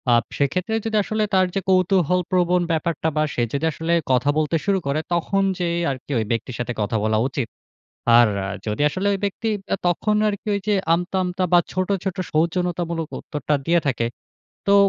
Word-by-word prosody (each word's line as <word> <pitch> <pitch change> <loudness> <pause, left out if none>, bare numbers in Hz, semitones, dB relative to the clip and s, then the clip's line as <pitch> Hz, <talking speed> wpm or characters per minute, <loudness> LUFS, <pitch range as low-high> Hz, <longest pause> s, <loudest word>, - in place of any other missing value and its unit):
আব 120 - +3
সেক্ষেত্রে 185 +10 0
যদি 220 -1 0
আসলে 215 +1 -1
তার 185 -1 +5
যে - - +2
কৌতূহলপ্রবণ 180 -1 +2
ব্যাপারটা 160 0 0
বা, 155 - +3
সে 120 - 0
যদি 145 +3 0
আসলে 160 +3 -2 0.2
কথা 130 +3 +3
বলতে 155 +1 +1
শুরু 195 -2 +2
করে 140 +3 +1
তখন 195 +3 +1 0.2
যেয়ে 170 -1 0
আরকি 135 +2 -7
ওই 110 - -1
ব্যক্তির 115 +1 -2
সাথে 120 0 -2
কথা 105 +2 0
বলা 110 0 +2
উচিত। 130 -3 -3 0.7
আর 120 - +7 0.4
যদি 105 +7 -1
আসলে 190 +6 -3
ঐ - - +1
ব্যক্তি 215 +3 -2 0.3
আ - - 0
তখন 210 +5 +1
আরকি 205 +1 -4
ওই 200 - -1
যে 205 - +4 0.2
আমতা, 180 +2 -2
আমতা 180 +1 -1
বা 175 - +8
ছোট, 185 +1 -1 0.2
ছোট 190 0 -2 0.2
সৌজন্যতামূলক 170 0 0
উত্তরটা 150 0 -2
দিয়ে 170 0 +4
থাকে, 120 -3 +1 0.6
তো 200 - +6
170 Hz, 180 wpm, -22 LUFS, 145-185 Hz, 0.7 s, বা